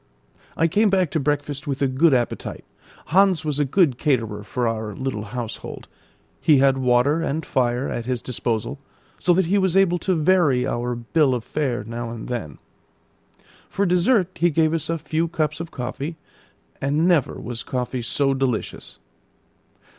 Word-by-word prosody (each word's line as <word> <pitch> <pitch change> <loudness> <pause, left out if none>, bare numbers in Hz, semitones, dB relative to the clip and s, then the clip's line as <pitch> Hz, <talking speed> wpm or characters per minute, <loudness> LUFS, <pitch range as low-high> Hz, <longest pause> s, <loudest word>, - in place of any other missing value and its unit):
I 165 - +3
came 210 +6 +3
back 185 -5 +2
to 160 - 0
breakfast 145 0 -2
with 135 -2 -2
a - - +4
good 140 +5 +3
appetite. 125 -3 -1 0.5
Hans 185 -4 +4
was 150 -1 -1
a 145 - +3
good 140 -3 +2
caterer 115 -8 0
for 120 +3 -2
our 110 -2 -3
little 130 -5 -3
household; 115 +1 -6 0.5
he 150 - +4
had 135 0 +3
water 130 +5 +3
and 160 0 -2
fire 125 -1 0
at 120 0 -4
his 125 -2 -2
disposal, 120 +2 -2 0.4
so 180 - +2
that 185 +1 +2
he 200 +4 +2
was 190 -1 +2
able 175 -2 +3
to 185 +1 0
vary 155 -6 +3
our 120 +1 -2
bill 130 +3 +1
of 120 - -4
fare 130 -5 -2
now 115 +1 -5
and 115 0 -7
then. 110 - -4 1.1
For 200 - 0
dessert 180 +2 +3
he 175 -1 +2
gave 160 0 +2
us 165 -1 -2
a 165 - 0
few 160 +2 -1
cups 155 -2 -2
of 170 0 -5
coffee, 140 +5 -5 0.6
and 145 +5 +1
never 170 -7 +2
was 120 +1 -5
coffee 125 0 -3
so 135 +4 +1
delicious. 130 -4 -3
140 Hz, 170 wpm, -23 LUFS, 125-165 Hz, 1.1 s, a